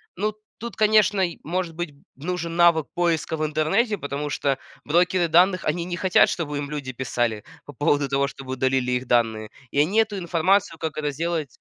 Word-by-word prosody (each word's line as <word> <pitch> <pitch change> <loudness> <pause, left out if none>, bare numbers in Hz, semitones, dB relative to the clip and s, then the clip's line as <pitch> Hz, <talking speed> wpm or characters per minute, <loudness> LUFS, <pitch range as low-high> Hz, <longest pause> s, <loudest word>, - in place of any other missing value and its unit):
Ну, 210 +3 -1 0.2
тут, 235 -1 -7
конечно, 215 -2 +3
и 175 -3 -1
может 170 0 -3
быть 175 -3 -4 0.2
нужен 170 +3 -4
навык 170 -3 +4
поиска 170 -2 0
в 155 - -1
интернете, 160 +9 +1
потому 145 -2 -4
что 140 -1 0 0.3
брокеры 175 +3 +2
данных 180 +3 +4
они 170 -1 -1
не 175 0 -4
хотят, 185 -1 +4
чтобы 150 -4 -3
им 145 0 -4
люди 140 -3 -4
писали 120 -3 -2 0.2
по 145 - -10
поводу 145 0 +1
того, 140 +1 +1
чтобы 135 -1 -7
удалили 130 -1 0
их 125 +1 -1
данные, 110 -3 +1 0.2
и 140 - 0
они 180 +9 +3
эту 215 -2 +1
информацию, 175 0 +1
как 160 -1 -4
это 150 -1 -1
сделать 165 +1 -2
160 Hz, 185 wpm, -24 LUFS, 140-180 Hz, 0.3 s, навык